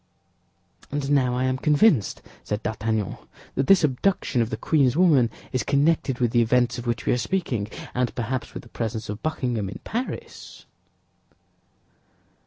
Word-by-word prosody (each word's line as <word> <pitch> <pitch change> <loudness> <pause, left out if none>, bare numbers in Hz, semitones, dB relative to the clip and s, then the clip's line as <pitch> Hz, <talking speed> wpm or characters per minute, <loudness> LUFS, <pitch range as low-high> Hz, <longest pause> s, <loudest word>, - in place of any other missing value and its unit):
"And 145 0 -2
now 130 -3 +3
I 130 - 0
am 130 0 0
convinced," 150 - +3 0.2
said 105 +1 -3
D'Artagnan, 110 -1 -2 0.4
"that 135 - -1
this 195 -3 +6
abduction 145 -1 +1
of 115 - 0
the - - -3
queen's 140 -3 +2
woman 150 -10 +5 0.2
is 130 - 0
connected 140 -2 +1
with 120 -3 +1
the 120 - +4
events 120 +1 +2
of 120 - -7
which 115 -2 -2
we - - +3
are 125 - 0
speaking, 130 - -1 0.3
and 125 -1 -1
perhaps 125 +1 -3
with - - -6
the 120 - -16
presence 110 -2 -4
of 105 +1 -5
Buckingham 125 -10 -2
in - - -7
Paris." 245 +4 -6
125 Hz, 160 wpm, -24 LUFS, 115-145 Hz, 0.4 s, this